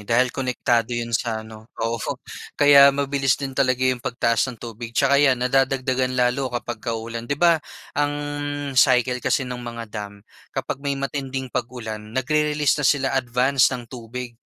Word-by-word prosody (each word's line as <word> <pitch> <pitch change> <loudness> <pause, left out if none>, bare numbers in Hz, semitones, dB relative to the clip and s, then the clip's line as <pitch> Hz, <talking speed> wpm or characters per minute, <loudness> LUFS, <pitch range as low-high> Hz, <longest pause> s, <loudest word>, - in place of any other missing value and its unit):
dahil 125 +2 +3
konektado 120 -3 0
'yon 115 0 -4
sa 110 -1 -1
ano, 110 +1 -13
oo, 115 0 -2 0.6
kaya 140 -1 +8
mabilis 140 -1 +1
din 135 -1 -5
talaga 130 -1 +1
yung 130 -1 +1
pagtaas 120 +1 0
ng 120 - -7
tubig 115 0 -8
'tsaka 140 0 +4
'yan 135 -3 +4
nadadagdagan 130 -1 +1
lalo 125 +2 +1
kapagka 120 -1 -4
uulan. 115 +1 -6
'Di 140 - 0
ba 170 -1 +4 0.3
ang 145 0 0 0.6
cycle 125 -1 +3
kasi 135 - +1
ng 125 -1 -6
mga 115 -1 -6
dam, 100 -1 -7 0.2
kapag 135 - -4
may 140 -1 -2
matinding 135 -2 -4
pag-ulan, 115 -3 -4 0.2
nag-re-release 150 +2 +1
na 140 - +2
sila 135 -2 +2
advanced 130 +1 +2
ng 120 - -9
tubig. 120 0 -7
125 Hz, 160 wpm, -23 LUFS, 115-135 Hz, 0.6 s, kaya